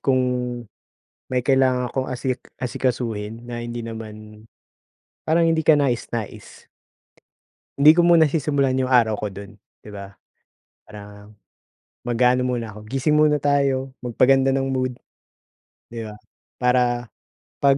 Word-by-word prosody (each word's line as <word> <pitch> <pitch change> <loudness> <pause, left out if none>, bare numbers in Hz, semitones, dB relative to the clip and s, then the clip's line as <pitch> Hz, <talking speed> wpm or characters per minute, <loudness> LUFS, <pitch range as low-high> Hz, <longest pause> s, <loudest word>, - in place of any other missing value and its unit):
kung 130 -2 +2 1.1
may 125 -1 0
kailangan 130 -2 +2
akong 130 -1 -3
asik 130 0 -3 0.2
asikasuhin 115 -3 -3
na 120 -1 -6
hindi 120 0 -5
naman, 110 -1 -9 0.8
parang 165 +1 +3
hindi 160 -1 +1
ka 155 -2 +6
nais 130 -5 0
nais. 115 -3 -7 1.1
Hindi 150 +2 +8
ko 175 - +3
muna 170 -2 +5
sisimulan 140 -3 0
yung 130 0 -1
araw 115 -4 +4
ko 105 - -2
dun 100 +2 -10 0.3
di 105 - -13
ba? 100 0 -9 0.8
Parang 105 0 -13 0.7
mag-aano 125 +1 +2
muna 120 -4 -3
ako 105 0 -11
gising 135 +3 +1
muna 150 -1 +4
tayo 135 -2 0
magpaganda 130 +2 +3
ng 135 0 0
mood. 130 -2 -2 0.9
Di 115 -1 -5
ba, 105 -1 -8 0.4
para 125 -1 +1 0.6
pag, 140 -1 +4
125 Hz, 130 wpm, -22 LUFS, 115-135 Hz, 1.1 s, Hindi